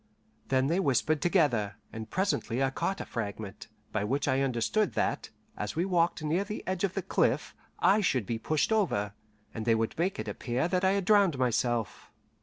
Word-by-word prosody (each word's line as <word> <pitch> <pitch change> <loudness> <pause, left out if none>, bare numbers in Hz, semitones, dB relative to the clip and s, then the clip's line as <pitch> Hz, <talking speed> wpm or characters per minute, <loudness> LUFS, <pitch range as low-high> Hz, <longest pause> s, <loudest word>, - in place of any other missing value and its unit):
Then 130 0 +2
they 165 +6 +1
whispered 155 -1 +1
together, 125 - +2 0.2
and 110 0 -6
presently 155 - 0
I 135 - +1
caught 195 +8 -2
a - - -5
fragment, 105 -3 -5 0.2
by 110 - -1
which 135 +8 -1
I 130 0 +2
understood 135 - +1
that, - - -1 0.3
as 105 0 -4
we 170 +3 +1
walked 175 -3 +1
near 165 +6 +1
the 210 +1 -6
edge 185 0 -2
of 190 -2 0
the - - -2
cliff, - - +1 0.2
I 205 +2 +4
should 130 - +1
be 115 +3 -3
pushed 155 - 0
over, 105 - +1 0.4
and 110 - -4
they 115 0 +3
would 110 0 -1
make 185 +3 0
it 110 - -4
appear 120 +7 -1
that 180 +1 0
I 190 +1 +4
had 200 -2 0
drowned 200 -7 +4
myself. 120 -4 -1
135 Hz, 195 wpm, -29 LUFS, 115-185 Hz, 0.4 s, I